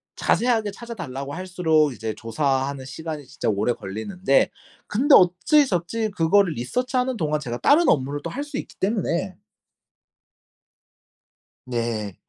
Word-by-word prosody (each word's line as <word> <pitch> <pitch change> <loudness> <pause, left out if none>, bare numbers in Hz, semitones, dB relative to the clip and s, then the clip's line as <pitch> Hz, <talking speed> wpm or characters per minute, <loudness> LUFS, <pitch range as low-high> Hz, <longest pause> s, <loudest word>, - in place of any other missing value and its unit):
자세하게 225 -4 +1
찾아 235 +3 -8
달라고 140 - -6
할수록 165 -5 +1
이제 110 -1 -4
조사하는 135 +3 -1
시간이 155 0 -6
진짜 125 - -3
오래 105 +4 +1
걸리는데 135 - 0 0.4
근데 275 +7 +5
어찌저찌 185 - +3
그거를 185 0 +3
research하는 250 - -1
동안 150 -4 0
제가 120 -4 -4
다른 320 +4 +4
업무를 145 0 +1
또 - - -3
할 285 +3 -4
수 290 -1 -6
있기 - - -7
때문에 190 -3 -1 2.3
네. 115 -5 -3
165 Hz, 320 characters per minute, -23 LUFS, 135-215 Hz, 2.3 s, 근데